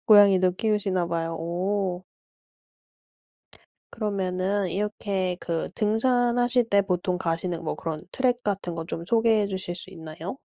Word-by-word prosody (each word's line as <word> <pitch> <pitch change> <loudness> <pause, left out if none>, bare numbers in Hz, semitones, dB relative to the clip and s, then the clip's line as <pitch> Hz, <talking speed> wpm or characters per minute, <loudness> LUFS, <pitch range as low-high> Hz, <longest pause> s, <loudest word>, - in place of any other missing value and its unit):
고양이도 195 -4 +7
키우시나 195 -3 0
봐요. 165 -1 -2
오. 180 +2 -1 1.9
그러면은 195 -2 -1
이렇게 195 -2 -1
그 165 -1 -2
등산하실 245 +2 +2
때 200 0 +5
보통 180 -1 -1
가시는 165 0 -2
뭐 155 - -2
그런 160 -2 -4
트랙 250 -2 +1
같은 195 -4 -2
것 165 - -3
좀 170 - -5
소개해 225 -1 +3
주실 185 -2 -3
수 180 - -3
있나요? 165 +5 -7
190 Hz, 270 characters per minute, -26 LUFS, 175-210 Hz, 1.9 s, 고양이도